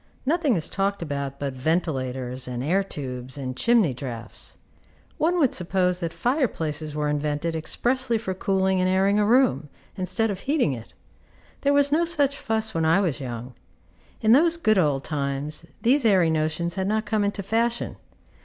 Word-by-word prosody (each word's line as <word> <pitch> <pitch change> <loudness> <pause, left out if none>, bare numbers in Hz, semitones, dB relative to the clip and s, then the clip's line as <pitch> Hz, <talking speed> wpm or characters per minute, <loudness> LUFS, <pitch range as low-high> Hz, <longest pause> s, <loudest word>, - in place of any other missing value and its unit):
Nothing 300 -4 +2
is 165 - -1
talked 195 -1 -1
about 140 -3 -4
but 140 -2 -3
ventilators, 130 -4 -1
and 125 0 -4
air 180 +7 +2
tubes, 130 -7 -6
and 130 -2 -4
chimney 230 - +3
draughts. 120 -2 -8 0.6
One 340 +3 +2
would 280 -7 +3
suppose 180 0 0
that 170 -2 -3
fire 260 - +1
places 155 -4 -3
were 150 -1 -1
invented 150 +2 -1
expressly 240 +9 0
for 200 -4 -3
cooling 190 0 +1
and 185 - +2
airing 195 +2 +3
a 210 - +3
room, 245 - +3 0.3
instead 210 +4 -1
of 190 - -5
heating 275 - +1
it. 115 -2 -9 0.7
There 280 - +2
was 285 0 +3
no 320 +3 +3
such 290 -5 +1
fuss 220 -2 -1
when 165 - 0
I 160 +4 +4
was 165 -8 -1
young; 120 0 -6 0.7
in 220 - +3
those 330 +6 +5
good 215 - +3
old 145 -5 +1
times 145 +2 -3 0.2
these 265 +4 +3
airy 185 -7 +4
notions 160 +2 0
had 190 +1 -2
not 215 +1 0
come 215 -2 0
into 200 0 -1
fashion. 230 +4 0
185 Hz, 170 wpm, -25 LUFS, 145-225 Hz, 0.7 s, those